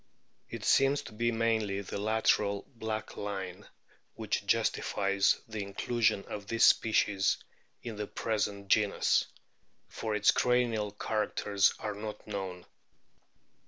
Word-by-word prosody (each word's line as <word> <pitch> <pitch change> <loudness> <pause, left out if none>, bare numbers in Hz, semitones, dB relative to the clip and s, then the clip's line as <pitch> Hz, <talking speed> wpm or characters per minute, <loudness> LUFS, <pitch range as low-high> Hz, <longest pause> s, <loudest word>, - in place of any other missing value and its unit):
It - - -6
seems 135 +1 +4
to - - -10
be 120 +2 0
mainly 110 -3 0
the 100 - -5
lateral 105 -1 +1
black 110 -2 -4
line 95 -1 -5 0.5
which - - -2
justifies 100 -1 +2
the 110 -2 -5
inclusion 100 +1 0
of 100 -1 -7
this 115 +1 +4
species 105 -3 +3 0.5
in 115 -3 -6
the 105 -1 -3
present 100 -2 -2
genus, 105 -1 +3 0.6
for 110 -2 -3
its 105 0 +5
cranial 120 -4 +1
characters 105 -1 0
are 105 -1 -4
not 105 +1 -7
known. 95 -4 -5
105 Hz, 120 wpm, -31 LUFS, 100-110 Hz, 0.6 s, its